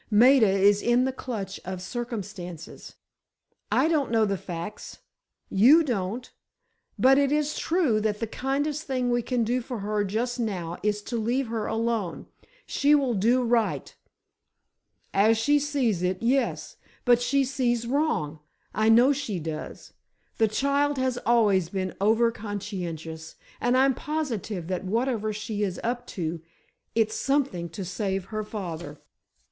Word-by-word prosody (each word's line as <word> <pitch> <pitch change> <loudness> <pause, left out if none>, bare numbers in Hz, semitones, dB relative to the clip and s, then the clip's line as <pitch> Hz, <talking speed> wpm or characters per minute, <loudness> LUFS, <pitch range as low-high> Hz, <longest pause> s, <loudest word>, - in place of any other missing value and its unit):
Maida 235 +1 +6
is 200 +1 +4
in 240 +1 +3
the 265 - 0
clutch 235 -6 -5
of 185 0 -5
circumstances. 185 - -7 0.8
I - - +3
don't 305 -5 +1
know 225 -1 +3
the 200 -1 0
facts, 175 +2 -7 0.5
you 265 +12 +6
don't; 235 -2 -3 0.7
but 270 +2 +5
it 280 -1 +2
is 300 0 +1
true 320 -11 +1
that 210 -1 -1
the 230 - -1
kindest 280 +6 -2
thing 255 -2 0
we 240 0 +2
can 245 0 0
do 245 +3 0
for 245 0 -6
her 210 +1 0
just 235 +5 -2
now 180 -7 -3
is 210 0 -1
to 235 - -3
leave 240 +3 0
her 225 -2 -2
alone. 225 -5 -2 0.4
She 290 +1 +3
will 270 -4 +1
do 235 +5 +2
right——" 235 -2 0 1.2
"As 215 +3 +4
she 290 +6 +3
sees 275 - 0
it, 185 +3 -1
yes! 260 +3 0 0.3
But 245 -1 +5
she 270 +3 +2
sees 245 -3 0
wrong, 240 - 0 0.3
I 215 +1 +2
know 240 +5 +6
she 260 -10 -3
does! 155 -1 -7 0.5
The 220 - +5
child 280 +5 +1
has 260 -1 0
always 205 -7 +3
been 185 -2 -2
overconscientious—and 205 -2 -2
I'm 270 +1 +4
positive 235 - -3
that 185 +1 -3
whatever 220 +2 -1
she 210 0 -4
is 195 -3 -1
up 245 +1 -2
to, 165 -2 -3 0.5
it's 220 -1 +2
something 270 -12 0
to 190 +3 -6
save 190 +1 -2
her 215 +1 -4
father!" 170 -8 -6
225 Hz, 145 wpm, -26 LUFS, 195-255 Hz, 1.2 s, Maida